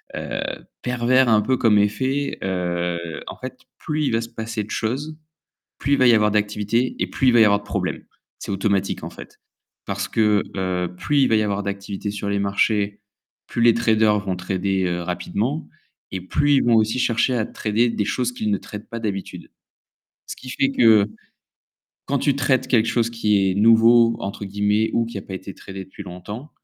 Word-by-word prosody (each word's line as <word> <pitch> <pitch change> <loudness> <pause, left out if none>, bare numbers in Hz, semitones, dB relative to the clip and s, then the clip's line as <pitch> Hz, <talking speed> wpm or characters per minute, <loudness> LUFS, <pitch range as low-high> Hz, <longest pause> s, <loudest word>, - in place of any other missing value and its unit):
heu, - - -4 0.4
pervers 125 +1 +2
un 110 -1 +5
peu 130 +5 +1
comme 115 -4 +3
effet, 130 +7 0
heu, 85 -2 -2
en - - -7
fait - - -8 0.2
plus 155 0 -2
il - - 0
va 115 - +2
se 115 - -5
passer 110 -2 -5
de - - -18
choses, 140 +9 -3 0.6
plus 140 - +1
il - - +1
va 130 - +5
y 120 - +7
avoir 105 -1 +3
d'activités 105 +3 0
et - - 0
plus 135 - -1
il - - +6
va 120 - +5
y 110 - +8
avoir 100 -1 +4
de 105 - -15
problèmes. 100 -3 -3 0.3
C'est - - -7
automatique 100 0 0
en - - -5
fait. - - -13 0.5
Parce 100 +1 -3
que, 105 -3 +2
heu, 90 -2 -2
plus 145 +8 +1
il - - +4
va 110 - +3
y 110 - +3
avoir 100 -1 -1
d'activité 100 +1 -4
sur 100 0 -4
les 100 0 0
marchés, 100 +1 0 0.5
plus 120 - -2
les 115 0 +7
traders 110 -2 +3
vont 95 -3 -3
trader, 95 +1 -1
heu, 90 0 -1
rapidement 100 - -2 0.5
et 95 - -3
plus 145 +10 +1
ils - - +3
vont 120 - +4
aussi 110 +3 +2
chercher 120 +1 +1
à 110 - 0
trader 115 +3 0
des 105 -3 -1
choses 125 +3 -1
qu'ils 110 -3 -2
ne 100 - +1
tradent 105 0 -10
pas 115 - -6
d'habitude. 100 -4 -5 0.8
Ce - - -6
qui 130 - -11
fait 135 +1 0
que 110 -5 +5 1.0
quand 140 - 0
tu 140 0 +1
traites 130 -1 +1
quelque 115 -4 +3
chose 115 0 +1
qui 105 -4 +2
est 95 - -1
«nouveau», 115 +2 +5
entre 100 +1 -5
guillemets 105 +2 +1
ou 115 - +2
qui 115 -3 -6
a - - -7
pas 95 - -8
été 95 +1 -7
tradé 95 -1 -9
depuis 95 +2 -11
longtemps 105 +10 -8
105 Hz, 205 wpm, -22 LUFS, 100-120 Hz, 1.0 s, y